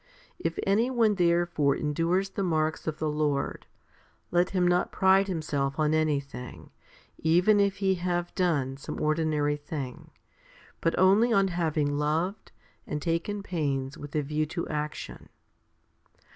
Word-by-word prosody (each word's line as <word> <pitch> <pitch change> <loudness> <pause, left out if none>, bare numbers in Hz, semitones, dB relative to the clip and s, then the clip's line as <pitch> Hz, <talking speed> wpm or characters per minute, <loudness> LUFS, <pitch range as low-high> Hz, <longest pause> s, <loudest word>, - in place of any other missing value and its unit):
If 165 - -2
any 215 +5 +2
one 230 -4 +3
therefore 170 -6 +2
endures 170 +6 0
the - - -3
marks 160 -4 0
of 155 -1 -2
the 155 - -2
Lord, 150 -2 -1 0.6
1 175 - +3
let 180 - +2
him 180 -2 +1
not 175 0 +2
pride 190 +1 +4
himself 145 -6 -2
on 155 0 +2
anything, 140 -5 -2 0.5
even 180 +6 +4
if 200 -1 +2
he 195 -1 +1
have 175 -1 -1
done 145 -8 0
some 140 - -7
ordinary 155 -1 +1
thing, 145 -4 -7 0.7
but 165 - +1
only 200 +6 +5
on 195 -3 +3
having 155 -4 0
loved 165 +7 -1 0.4
and 150 - -3
taken 170 +6 -2
pains 140 -7 -2
with 145 0 -9
a 150 - +1
view 150 +2 -1
to 170 +2 -4
action. 150 0 -5
165 Hz, 145 wpm, -28 LUFS, 150-185 Hz, 0.7 s, only